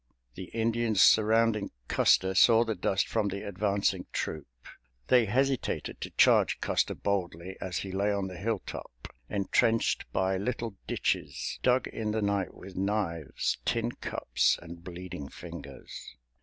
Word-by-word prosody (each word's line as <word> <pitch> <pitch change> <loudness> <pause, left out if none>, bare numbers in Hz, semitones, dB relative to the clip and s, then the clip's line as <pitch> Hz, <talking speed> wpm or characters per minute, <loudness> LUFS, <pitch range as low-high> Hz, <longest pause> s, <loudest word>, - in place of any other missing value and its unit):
The 95 - -7
Indians 115 0 0
surrounding 110 0 +4 0.2
Custer 95 0 +3
saw 115 +4 +6
the 115 -1 -1
dust 95 0 0
from 110 -2 0
the 100 +1 -4
advancing 100 0 0
troop. 75 -2 -3 0.6
They 125 -2 +6
hesitated 130 +4 -1
to - - -4
charge - - +5
Custer - - 0
boldly 95 -2 -2
as 90 -1 -3
he 95 - -4
lay 100 +2 +1
on 100 -1 -1
the 90 -1 -8
hilltop, 95 - -5 0.2
entrenched 105 +3 +1
by 95 0 +1
little 115 +1 -3
ditches - - -2
dug 125 0 +3
in 110 -1 -4
the 110 +1 0
night 100 -2 -1
with 95 0 -11
knives, 95 -6 -1
tin 115 0 0
cups - - 0
and 85 0 -11
bleeding 90 -5 -7
fingers. 60 - -10
100 Hz, 140 wpm, -29 LUFS, 95-115 Hz, 0.6 s, saw